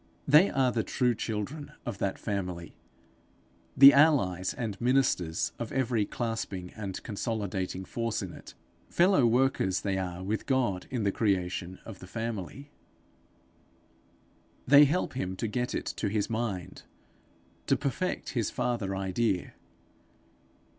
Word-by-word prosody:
They 150 +7 +7
are 130 -2 +2
the 115 - 0
true 125 +2 +1
children 115 +7 -4
of 95 - -5
that 100 - -1
family, 90 -5 -4 1.0
the 140 +1 +11
allies 125 - +3
and 110 -5 -5
ministers 120 -10 +1
of 120 - -4
every 120 -5 +1
clasping 110 -6 -4
and 100 -4 -6
consolidating 100 -4 -3
force 115 -1 -2
in 90 - -7
it; - - -12 0.3
fellow 175 -8 +4
workers 120 -6 +2
they 95 -2 -1
are 90 -1 -4
with 105 +3 -3
God 120 -9 0
in 120 -4 -2
the 100 - +2
creation 95 -3 -1
of 110 -4 -9
the 95 - -11
family; 115 +6 -5 1.9
they 145 +2 +8
help 160 +6 0
him 95 -7 -3
to 115 - -3
get 125 +3 -2
it - - -3
to 105 - -1
his 105 +2 -1
mind, 110 -6 -3 0.9
to - - +3
perfect 160 +7 -2
his 115 -5 -1
father 105 -6 -2
idea. 95 0 -1
110 Hz, 135 wpm, -29 LUFS, 95-125 Hz, 1.9 s, the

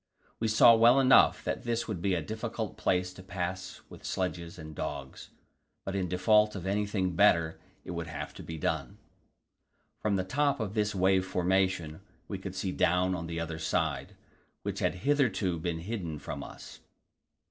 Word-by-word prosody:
We 115 - 0
saw 110 +2 +7
well 120 +3 +6
enough 135 -1 +5
that - - -2
this 120 -1 -1
would 100 -7 -4
be 95 0 +1
a - - -2
difficult 110 -1 -4
place 90 0 0
to 95 - -11
pass 90 -1 -5
with - - -13
sledges 85 -2 -3
and 80 -2 -9
dogs, 70 -2 -6 0.6
but 95 - -3
in 95 -2 0
default 105 +4 +3
of 95 - -6
anything 100 -2 0
better 85 -4 +4 0.3
it - - -6
would 85 -1 -4
have 80 - -6
to - - -10
be 80 - -7
done. 75 -4 -2 1.0
From 105 -2 0
the 95 - 0
top 140 +7 +1
of 105 -3 -3
this 105 -2 0
wave 95 0 +3
formation 90 -3 0 0.3
we 100 - -4
could 95 -1 -7
see 95 0 -2
down 90 +1 +2
on 85 -2 -4
the 85 0 -4
other 85 -1 -4
side, 80 - -1 0.5
which - - -3
had - - 0
hitherto 110 - +2
been 80 0 -3
hidden 90 -5 -4
from 70 -1 -6
us. - - -11
95 Hz, 175 wpm, -30 LUFS, 85-105 Hz, 1.0 s, saw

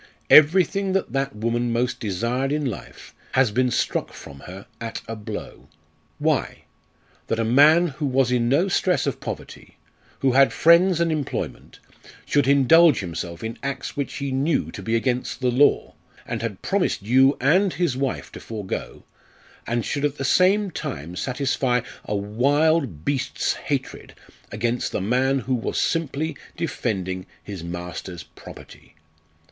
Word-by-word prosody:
Everything 185 +5 +5
that 195 - -1
that 135 -1 -1
woman 115 +2 -1
most 120 +2 -1
desired 115 +6 -1
in 150 0 -1
life 120 -7 -7 0.2
has 130 -4 +3
been 125 +3 +2
struck 120 - -1
from 70 -1 -11
her 95 +2 -9
at 115 -1 -6
a 115 - -5
blow. 105 -1 -8 0.5
Why? - - -1 0.6
That 115 - -1
a 115 - 0
man 150 +8 +5
who 145 +1 -3
was 130 -1 +2
in 120 -1 +1
no 155 +9 +3
stress 185 -1 +1
of - - -2
poverty, - - -8 0.4
who 135 - +3
had 135 +2 +5
friends 170 +2 +5
and 170 -1 +1
employment, 150 -4 -4 0.5
should 145 -2 +2
indulge 140 +1 +5
himself 85 0 -6
in 115 +1 -5
acts 140 0 -4
which 140 -1 -3
he 140 -1 -3
knew 140 +5 0
to - - -8
be 115 0 -1
against 125 +1 -1
the 125 -1 +1
law, 140 +4 +3 0.3
and - - -4
had 115 -5 -5
promised 195 - 0
you 130 +6 +4
and 180 +9 +3
his 175 -8 0
wife 135 0 -3
to - - -9
forego, 105 -4 -6 0.6
and 120 0 -1
should 145 - -2
at 145 0 0
the 135 - -3
same 190 +6 +3
time 80 - -6
satisfy 130 0 0 0.2
a 105 - -2
wild 125 - +1
beast's 135 -3 -1
hatred - - -5 0.4
against 120 +3 -1
the - - 0
man, 130 +7 +1
who 130 +3 -2
was 120 - -1
simply 160 -1 -1 0.2
defending 95 - -3 0.2
his 95 -5 -7
master's 90 +1 -6
property. - - -14
130 Hz, 150 wpm, -23 LUFS, 115-145 Hz, 0.6 s, Everything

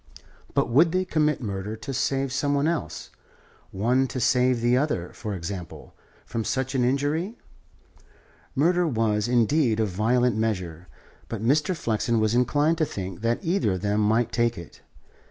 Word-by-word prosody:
But - - +2
would 155 +8 +4
they 185 0 +1
commit 150 -4 +1
murder 100 0 -4
to 110 +5 -6
save 135 0 -1
some 145 +1 0
one 140 +2 +1
else, 170 -1 -3 0.6
one 125 +7 +1
to 130 - -5
save 125 +1 +3
the 120 +1 +2
other, 130 - -1
for 105 -3 -5
example, 90 0 -7 0.3
from 115 - -3
such 130 +3 -2
an 130 -2 +1
injury? 145 - 0 1.2
Murder 175 +5 +3
was, 110 -5 0
indeed, 120 0 +2
a 110 - +3
violent 115 +5 +1
measure; 90 -6 -2 0.4
but 110 -2 -4
Mr. 150 +8 +2
Flexen 115 -3 0
was 110 0 +1
inclined 145 +7 +2
to 155 - +3
think 95 - -6
that 115 - 0
either 170 - +1
of 90 - -4
them 105 +1 0
might 110 +3 +2
take 120 0 +1
it. 85 - -11
120 Hz, 160 wpm, -25 LUFS, 105-145 Hz, 1.2 s, would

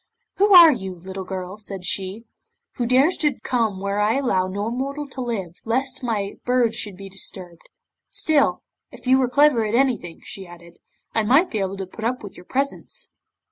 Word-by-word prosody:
'"Who 400 0 +5
are 340 -3 +11
you, 190 -8 -4
little 190 +2 -7
girl," 185 +1 -6
said 195 -3 -7
she, 190 +4 -2 0.5
"who 240 -3 0
dares 270 +8 +4
to 295 -5 0
come 225 -6 0
where 200 +1 -2
I 210 +3 +2
allow 195 -9 +1
no 205 +4 -3
mortal 275 +4 -3
to 265 - -7
live, 210 -8 -3
lest 260 +3 -1
my 210 -4 -2
birds 245 -2 +2
should 205 -4 -4
be 195 0 -9
disturbed? 185 -3 -7 0.4
Still, 310 -3 +2 0.3
if - - -14
you 260 +1 +4
are 250 - +1
clever 285 -3 +4
at 215 +1 -1
anything," 240 -10 0
she 190 -2 -8
added, 170 0 -15 0.3
"I 225 - +2
might 270 - +3
be 220 - -1
able 195 0 -2
to 190 - -4
put 205 +4 -10
up 245 +1 -1
with 200 - -9
your 180 - -13
presence." 275 +5 -4
220 Hz, 190 wpm, -22 LUFS, 190-260 Hz, 0.5 s, are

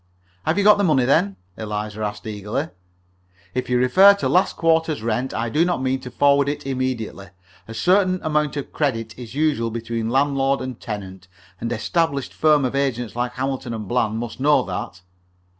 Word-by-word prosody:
"Have 160 +4 +2
you 200 - +2
got 210 0 +6
the - - +2
money, 145 -8 +3
then?" 100 -7 +2 0.2
Eliza 105 0 -4
asked, 105 -1 -4
eagerly. 105 -1 -3 0.8
"If 125 - -3
you 125 - +2
refer 185 +11 +6
to 200 - -2
last 185 +2 +2
quarter's 160 -5 +1
rent, 120 +3 -1
I 115 -1 -2
do 150 +8 +2
not 175 -3 0
mean 130 0 0
to 130 -1 -8
forward 140 +2 +3
it 145 0 -4
immediately. 130 -7 -3 0.4
A 115 - -8
certain 185 - +3
amount 150 -2 0
of 140 - -6
credit 115 -7 -1
is 120 -1 -10
usual 145 -7 +1
between 115 0 -3
landlord 135 +1 +2
and 130 -2 -6
tenant. 95 -3 -7 0.3
An 115 - -3
established 140 +4 -1
firm 150 -3 +3
of 125 - -2
agents 125 -5 -1
like 120 0 -2
Hamilton 130 -2 -3
& - - -9
Bland 110 -2 0
must 115 +1 -5
know 145 +2 +4
that." 90 - -6
130 Hz, 180 wpm, -22 LUFS, 115-150 Hz, 0.8 s, got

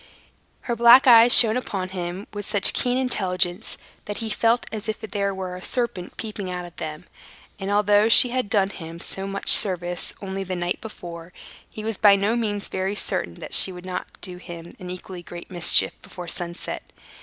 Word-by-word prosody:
Her 240 - -4
black 235 +3 +6
eyes 235 -1 +7
shone 225 -3 +10
upon 195 -7 -4
him 180 +1 -6
with 205 -1 -7
such 205 -2 +3
a - - -18
keen 250 0 -1
intelligence, 190 -6 -1 0.3
that 205 - -6
he 225 -1 -5
felt 230 +2 0
as 220 0 -6
if 215 - -4
there 200 -2 -3
were 190 -1 -6
a 180 - -10
serpent 215 -6 -4
peeping 210 -4 -6
out 180 -1 -6
of 175 - -14
them; 155 +2 -8 0.5
and, 195 0 -5
although 205 +1 +2
she 245 +2 +7
had 250 -3 -3
done 200 -3 +1
him 165 -2 -10
so 195 +3 +1
much 195 0 -4
service 175 -3 +2
only 195 0 -6
the 185 -1 -5
night 175 0 -4
before, 175 -5 -11 0.4
he 215 - -10
was 220 -2 -5
by 205 -2 +6
no 200 +4 -1
means 210 -4 -3
very 190 +2 -4
certain 85 - -4
that - - -10
she 190 - +7
would 180 0 -11
not 185 -1 -6
do 180 -2 -9
him 170 -1 -11
an 180 - -9
equally 180 0 -9
great 175 +1 -12
mischief 175 -2 +3
before 180 -1 -11
sunset. 170 +1 -4
195 Hz, 195 wpm, -22 LUFS, 180-220 Hz, 0.5 s, shone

